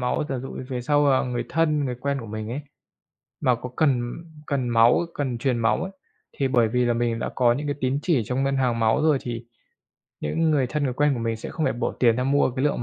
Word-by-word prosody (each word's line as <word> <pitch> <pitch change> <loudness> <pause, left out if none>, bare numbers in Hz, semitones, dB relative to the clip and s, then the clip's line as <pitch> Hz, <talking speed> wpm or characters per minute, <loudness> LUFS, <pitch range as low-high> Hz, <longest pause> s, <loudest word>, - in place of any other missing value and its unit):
máu. 125 +4 0
Giả 135 - -2
dụ 135 +2 -7
về 125 -2 -3
sau, 145 +2 +3
à, 130 - +3
người 125 -1 -2
thân, 155 -3 +1
người 125 -2 -2
quen 140 +1 -1
của 115 - -8
mình 110 +1 -5
ấy 135 +5 -3 0.8
mà 125 -2 +3
có 125 +2 -7
cần 125 -6 +1 0.4
cần 130 -4 -1
máu, 115 +1 +5
cần 130 -5 -2
truyền 125 0 0
máu 115 -2 +1
ấy, 190 - -5 0.5
thì 135 - +1
bởi 120 -4 +3
vì 125 +2 +1
là 120 - +2
mình 115 -1 0
đã - - -2
có 120 -2 +4
những 145 +3 -4
cái 145 - -1
tín 130 +2 +1
chỉ 155 -9 +2
trong 130 +4 -1
ngân 135 0 +1
hàng 120 -3 +1
máu 110 +6 +3
rồi, 155 -3 +4
thì 120 -1 -5 0.8
những 160 - 0
người 140 -4 +2
thân, 150 +3 -2
người 130 - 0
quen 145 +1 +2
của 120 - -4
mình 115 -1 -1
sẽ - - -7
không 160 - -2
phải - - +2
bỏ 120 - -2
tiền 115 -2 +4
ra 125 - 0
mua 140 0 +3
cái 130 +3 -2
lượng 145 -5 0
125 Hz, 255 wpm, -24 LUFS, 120-140 Hz, 0.8 s, máu